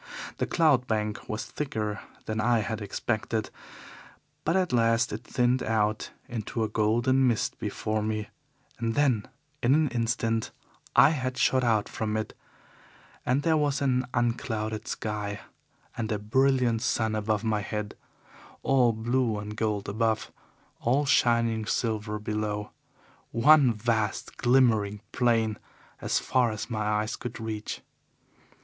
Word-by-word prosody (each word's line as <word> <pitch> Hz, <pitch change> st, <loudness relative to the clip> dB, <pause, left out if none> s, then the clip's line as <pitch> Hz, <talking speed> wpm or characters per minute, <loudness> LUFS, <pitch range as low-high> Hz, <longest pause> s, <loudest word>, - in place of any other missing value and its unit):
The -, -, -1 dB
cloud 145 Hz, -7 st, +3 dB
bank 105 Hz, -1 st, -2 dB
was 110 Hz, 0 st, -3 dB
thicker 110 Hz, -8 st, -3 dB, 0.3 s
than 110 Hz, 0 st, -2 dB
I 120 Hz, 0 st, +3 dB
had 110 Hz, 0 st, -3 dB
expected, 110 Hz, +1 st, -2 dB, 0.9 s
but 165 Hz, -, +1 dB
at 185 Hz, -6 st, +1 dB
last 115 Hz, 0 st, +3 dB
it 110 Hz, +3 st, -5 dB
thinned 125 Hz, +1 st, +1 dB
out 110 Hz, -1 st, 0 dB, 0.2 s
into 115 Hz, 0 st, -3 dB
a -, -, +1 dB
golden 120 Hz, +5 st, +2 dB
mist 115 Hz, -3 st, 0 dB
before 110 Hz, 0 st, -2 dB
me, 110 Hz, 0 st, -2 dB, 0.5 s
and 115 Hz, -1 st, -1 dB
then 130 Hz, -8 st, +2 dB, 0.3 s
in 125 Hz, +4 st, +4 dB
an 155 Hz, -2 st, +3 dB
instant 115 Hz, -1 st, 0 dB, 0.5 s
I -, -, +7 dB
had 130 Hz, -4 st, -2 dB
shot 130 Hz, -1 st, +3 dB
out 110 Hz, -4 st, +2 dB
from 110 Hz, -1 st, -2 dB
it, 110 Hz, -, -3 dB, 0.9 s
and 130 Hz, +3 st, +2 dB
there 160 Hz, -2 st, +3 dB
was 145 Hz, -2 st, +1 dB
an 130 Hz, -2 st, +1 dB
unclouded 115 Hz, -2 st, -1 dB
sky 105 Hz, -1 st, -3 dB, 0.5 s
and 110 Hz, -2 st, -3 dB
a 105 Hz, -, +1 dB
brilliant 125 Hz, +1 st, +2 dB
sun 110 Hz, -3 st, 0 dB
above 110 Hz, 0 st, 0 dB
my 110 Hz, -2 st, 0 dB
head 105 Hz, 0 st, -4 dB, 0.7 s
all 125 Hz, -3 st, +4 dB
blue 115 Hz, 0 st, 0 dB
and 105 Hz, +1 st, -6 dB
gold 105 Hz, -2 st, -1 dB
above, 110 Hz, +1 st, 0 dB, 0.5 s
all 135 Hz, +5 st, +2 dB
shining 115 Hz, -4 st, +2 dB
silver 110 Hz, -3 st, -1 dB
below, 105 Hz, 0 st, -3 dB, 0.6 s
one 140 Hz, +2 st, +6 dB
vast, 110 Hz, -1 st, -1 dB
glimmering 110 Hz, -5 st, +3 dB
plain 115 Hz, -4 st, +1 dB, 0.4 s
as -, -, +1 dB
far 125 Hz, -2 st, +2 dB
as 110 Hz, +3 st, -5 dB
my 110 Hz, -1 st, -1 dB
eyes 105 Hz, +2 st, 0 dB
could 120 Hz, -1 st, -7 dB
reach. 110 Hz, -1 st, -4 dB
115 Hz, 135 wpm, -28 LUFS, 110-125 Hz, 0.9 s, I